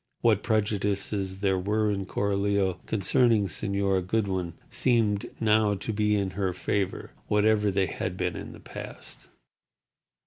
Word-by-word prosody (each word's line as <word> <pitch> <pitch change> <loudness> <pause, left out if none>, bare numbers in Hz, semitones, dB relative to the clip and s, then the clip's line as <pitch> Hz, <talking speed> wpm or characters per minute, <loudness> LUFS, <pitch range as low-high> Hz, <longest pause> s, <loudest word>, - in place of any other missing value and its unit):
What 110 -3 +3
prejudices 100 -3 -1
there 95 -2 +2
were 105 +3 +1
in 100 -2 -3
Coralio 100 -2 0
concerning 110 +1 +3
Señora 100 +1 0
Goodwin 95 -5 -1 0.2
seemed 110 -5 +1
now 105 -1 +3
to 100 +3 -4
be 105 0 +2
in 100 -2 0
her 95 -1 -1
favour, 95 +2 -2 0.2
whatever 105 0 +3
they 95 -1 +2
had 90 -1 -4
been 90 -1 -1
in - - -7
the - - -12
past. - - -9
100 Hz, 135 wpm, -27 LUFS, 95-105 Hz, 0.2 s, What